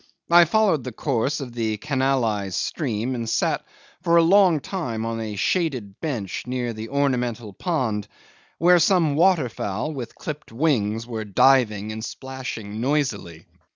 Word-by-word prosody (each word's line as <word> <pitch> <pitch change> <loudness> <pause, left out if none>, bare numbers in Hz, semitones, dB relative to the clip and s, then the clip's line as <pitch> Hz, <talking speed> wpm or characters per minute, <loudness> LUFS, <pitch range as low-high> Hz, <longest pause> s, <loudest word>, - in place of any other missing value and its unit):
I 175 0 +8
followed 190 - +2
the 125 - -5
course 135 +4 -1
of 125 -3 -7
the 110 -2 -1
canalised 125 -7 0
stream, 125 -5 -2
and 115 -2 -3
sat - - 0 0.4
for 170 -1 +3
a 170 - +6
long 180 -2 +5
time 125 - -4
on 115 0 -3
a 110 -2 -4
shaded 125 - -1
bench 115 - -3
near 125 -2 -2
the 110 +1 -7
ornamental 125 -6 -1
pond, 120 - -2 0.5
where 175 +2 +5
some 170 -3 +3
waterfowl 150 - +1
with 125 -5 -7
clipped 150 -5 -7
wings 115 -5 0
were 115 -2 -4
diving 110 -1 +3
and 110 0 -6
splashing 115 -5 -6
noisily. 120 - -1
125 Hz, 145 wpm, -23 LUFS, 110-150 Hz, 0.5 s, I